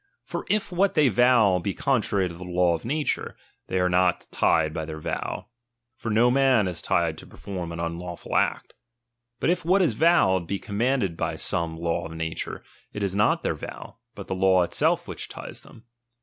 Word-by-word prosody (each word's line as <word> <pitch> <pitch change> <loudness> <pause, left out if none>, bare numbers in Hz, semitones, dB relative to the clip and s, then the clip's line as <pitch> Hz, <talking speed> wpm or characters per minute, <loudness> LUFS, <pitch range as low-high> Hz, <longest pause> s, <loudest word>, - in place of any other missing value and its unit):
For - - -6
if 210 -2 0
what 190 +3 +2
they 150 -4 +5
vow 115 -4 +4
be 95 +3 -3
contrary 105 -8 +1
to 85 - -8
the 85 +2 -9
law 90 -1 +2
of 85 - -4
nature, 150 +5 -2 0.3
they 95 - -1
are 90 - +3
not 90 0 +2
tied 80 0 +2
by 80 - -3
their 80 0 -6
vow; 75 - -4 0.5
for 120 -3 -5
no 115 +3 +4
man 130 -6 +4
is 90 - -3
tied - - 0
to - - -12
perform 90 -4 -6
an 85 - -6
unlawful 85 +1 -5
act. - - 0 0.7
But - - +2
if 180 -1 -1
what 185 +4 +3
is 170 - +2
vowed, 95 - +3
be 100 - -1
commanded 105 -2 -1
by - - -2
some 85 -1 -2
law 85 0 -2
of 80 - -10
nature, 80 0 -4 0.3
it 105 - -4
is 95 -1 -1
not 105 - +2
their - - 0
vow, - - -9 0.2
but - - -8
the - - -3
law 95 -1 +4
it 85 - -5
self - - +1
which - - -6
ties - - -8
them. 115 - -16
95 Hz, 200 wpm, -25 LUFS, 85-125 Hz, 0.7 s, they